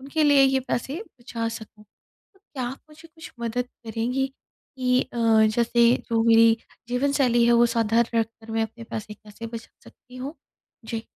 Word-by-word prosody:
उनके 280 +4 -1
लिए 285 -2 +6
ये 265 0 +3
पैसे 280 - -2 0.2
बचा 230 -2 -3
सकूँ। 215 -1 -15 0.7
क्या 260 -3 -3
आप 250 +3 -5
मुझे 315 +2 -15
कुछ 320 - -11
मदद 240 +2 -2 0.2
करेंगी 240 +4 -1
कि 255 -1 -3
अ, - - -5
जैसे 230 +1 +4 0.2
जो 225 -1 +2
मेरी 225 0 +6 0.3
जीवनशैली 250 -1 +2
है, 240 - +5
वो 235 0 +5
साधारण 230 0 +1
रख 225 - 0
कर 225 0 -16
मैं 225 0 +1
अपने 230 +1 -6
पैसे 215 -2 -6
कैसे 210 +2 -10
बचा 230 0 -8 0.2
सकती 250 0 -17
हूँ? 270 +4 -6 0.5
जी। 225 0 -4
235 Hz, 165 wpm, -24 LUFS, 225-260 Hz, 0.7 s, लिए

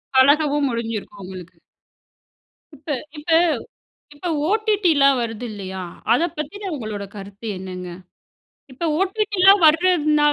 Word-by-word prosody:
பழகவும் 290 +2 +4
முடிஞ்சிருக்கும் 225 -4 -5
உங்களுக்கு. 180 -2 -10 1.2
இப்ப 295 +3 -14 0.3
இப்ப 300 +3 -9 0.8
இப்ப 295 +5 -7 0.2
OTTலா 400 -10 +3
வருது 230 0 -4
இல்லையா 190 -2 -6 0.3
அத 245 - +2 0.2
பத்தின 395 +6 -5
உங்களோட 215 -6 -5
கருத்து 200 +2 -9
என்னங்க? 185 -1 -7 0.8
இப்போ 300 +6 -3
OTTலா 390 -1 +4
வரதுனால 305 -2 +4
285 Hz, 100 wpm, -21 LUFS, 205-345 Hz, 1.2 s, பழகவும்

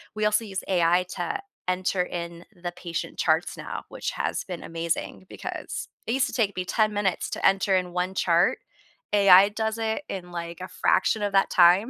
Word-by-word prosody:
we 215 0 0
also 210 +1 +2
use 195 -2 -4
AI 175 -1 +3
to 405 - -3 0.3
enter 185 0 +1
in 170 -1 -6 0.2
the 175 - -2
patient 170 -1 -5
charts - - +1
now, - - -5
which - - -4
has - - -2
been 180 -3 -6
amazing 165 +2 -3
because - - -6 0.2
it 230 - 0
used 265 +1 +2
to - - -8
take 215 -6 +1
me 185 - -2
10 215 +3 +1
minutes 205 -3 -1
to - - -5
enter 195 0 +4
in 180 -1 -1
one 180 +1 -1
chart. 175 -1 +2 0.5
AI 200 -1 +8
does 220 +1 -2
it 225 +5 -1
in, 180 -2 -6
like, 170 0 -6
a 185 - -5
fraction 215 - +1
of 205 - 0
that 195 - +4
time. 180 +7 +5
185 Hz, 190 wpm, -26 LUFS, 175-210 Hz, 0.5 s, AI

